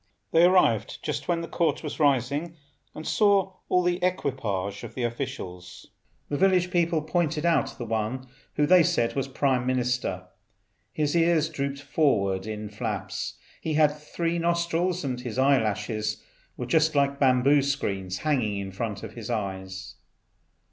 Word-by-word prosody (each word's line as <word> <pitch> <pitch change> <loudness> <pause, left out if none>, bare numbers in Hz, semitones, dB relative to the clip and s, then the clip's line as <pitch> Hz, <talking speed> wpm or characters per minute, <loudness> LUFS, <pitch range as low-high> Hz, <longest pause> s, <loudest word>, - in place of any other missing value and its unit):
They 165 +1 +6
arrived 125 - +3
just - - -3
when 170 -1 +1
the 165 - -5
Court 165 -3 0
was 150 - -5
rising, 145 +3 +1 0.4
and 155 - -7
saw 200 -3 +2
all 180 0 +3
the 180 0 0
equipages 110 - -1
of - - -9
the 125 - -2
officials. 95 -8 -5 0.4
The 145 - -2
village 185 -2 +3
people 170 -3 +1
pointed 160 -1 0
out 150 -6 +1
one 115 +2 -2 0.3
who 150 - +3
they 180 +3 +7
said 120 -7 +1
was 135 -1 -1
Prime 130 -2 0
Minister. 125 -7 -1 0.7
His 150 0 -1
ears 165 -2 +3
drooped 140 -2 -4
forward 100 -10 +1
in 105 -1 -5
flaps; 105 -1 -4 0.3
he 155 -1 -2
had 150 -1 +4
three 165 +3 -2
nostrils, 170 +1 0
and 125 -3 -3
his 125 -2 -6
eye 135 -1 +4
lashes 105 0 -2 0.3
were 125 - -3
just 155 +4 +2
like 140 0 +2
bamboo 135 +2 +4
screens 100 -10 -2
hanging 125 -10 0
in 100 -1 -5
front 105 0 -4
of 110 -1 -7
his 115 -2 -8
eyes. 95 -3 -4
140 Hz, 155 wpm, -26 LUFS, 110-165 Hz, 0.7 s, they